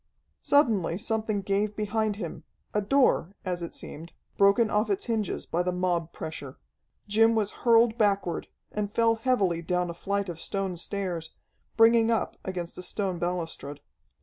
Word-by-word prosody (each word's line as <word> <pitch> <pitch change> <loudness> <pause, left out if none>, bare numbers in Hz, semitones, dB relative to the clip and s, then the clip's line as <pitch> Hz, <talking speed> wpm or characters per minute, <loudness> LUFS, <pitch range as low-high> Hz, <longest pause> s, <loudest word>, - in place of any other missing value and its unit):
Suddenly 220 - +3
something 215 -2 -1
gave 205 +2 0
behind 215 0 0
him 180 -6 -6 0.3
a 210 - +2
door, 205 - +2
as 180 -1 -2
it 170 - -6
seemed, 165 +3 -9 0.2
broken 200 +3 +4
off 210 +1 +1
its 200 - -1
hinges 220 -5 -2
by 170 - 0
the 180 0 0
mob 175 -2 -1
pressure. 140 -4 -7 0.5
Jim 225 +2 +4
was 210 -2 +1 0.2
hurled 230 0 +5
backward, 200 -5 +1 0.2
and 205 -1 -2
fell 230 0 +3
heavily 205 -9 +1
down 180 +1 -1
a - - -7
flight 200 +3 -2
of 170 -2 -6
stone 195 -1 -2
stairs, 175 -2 -3 0.5
bringing 225 0 +6
up 225 -3 0
against 180 -2 -5
a - - -4
stone 185 -1 -2
balustrade. 165 -5 -3
200 Hz, 155 wpm, -27 LUFS, 175-220 Hz, 0.5 s, bringing